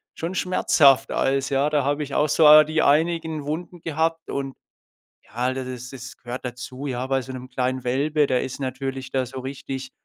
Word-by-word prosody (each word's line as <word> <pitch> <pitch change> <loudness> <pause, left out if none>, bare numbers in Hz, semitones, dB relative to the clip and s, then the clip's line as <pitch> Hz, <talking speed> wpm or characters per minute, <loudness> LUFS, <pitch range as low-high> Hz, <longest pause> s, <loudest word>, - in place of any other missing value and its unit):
schon 170 +3 -4
schmerzhaft 140 -7 +3
als 135 0 +1
ja, 140 +2 +1
da 150 -1 +1
habe 145 +1 0
ich 140 - -6
auch 150 - +3
so 155 0 +8
die 155 +1 0
einigen 160 0 +1
Wunden 170 +4 -5
gehabt 165 0 -1
und 135 -1 -3 0.7
ja, 125 +3 -2
d 130 -1 -4
d 130 - -6
das 125 0 -8
das 125 -2 -9
gehört 120 +2 -7
dazu. 125 +3 -7
Ja, 130 -1 -3
bei 135 0 +1
so 130 +1 -8
'nem 130 0 -8
kleinen 130 0 -2
Welpe, 145 +4 +1
der 125 -2 +1
ist 130 - -5
natürlich 130 0 -4
da 130 -1 0
so 130 +2 -7
richtig 130 0 -6
135 Hz, 195 wpm, -23 LUFS, 130-150 Hz, 0.7 s, so